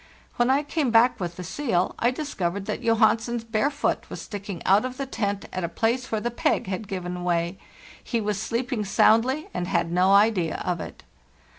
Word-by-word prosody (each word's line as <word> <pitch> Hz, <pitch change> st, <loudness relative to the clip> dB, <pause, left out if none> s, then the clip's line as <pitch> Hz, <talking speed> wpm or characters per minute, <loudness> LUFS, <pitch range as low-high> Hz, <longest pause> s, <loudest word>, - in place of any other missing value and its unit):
When 240 Hz, 0 st, +3 dB
I 275 Hz, +3 st, +3 dB
came 295 Hz, -2 st, -1 dB
back 235 Hz, +2 st, +4 dB
with 175 Hz, -2 st, -4 dB
the 180 Hz, -, -7 dB
seal 190 Hz, -, -1 dB
I 235 Hz, -, +3 dB
discovered 200 Hz, -, -3 dB
that -, -, -3 dB
Johansen's 230 Hz, +1 st, +2 dB
bare 230 Hz, +4 st, +1 dB
foot 290 Hz, 0 st, -2 dB
was -, -, -6 dB
sticking 200 Hz, -4 st, -7 dB
out 195 Hz, +3 st, +5 dB
of 255 Hz, 0 st, -5 dB
the 275 Hz, -, -3 dB
tent 205 Hz, -6 st, -2 dB
at 185 Hz, -, -3 dB
a 170 Hz, -, -1 dB
place 230 Hz, +7 st, -1 dB
where 220 Hz, -, +1 dB
the 240 Hz, +3 st, -2 dB
peg 235 Hz, -, 0 dB
had 195 Hz, +2 st, -4 dB
given 180 Hz, -2 st, -4 dB
way; 175 Hz, +1 st, -1 dB, 0.4 s
he 235 Hz, -, -1 dB
was 210 Hz, -2 st, -2 dB
sleeping 240 Hz, 0 st, -2 dB
soundly 230 Hz, +8 st, +3 dB
and 175 Hz, 0 st, -2 dB
had 170 Hz, -3 st, 0 dB
no 180 Hz, +2 st, +3 dB
idea 200 Hz, -5 st, +3 dB
of 180 Hz, -1 st, -1 dB
it. -, -, -9 dB
215 Hz, 195 wpm, -25 LUFS, 185-240 Hz, 0.4 s, out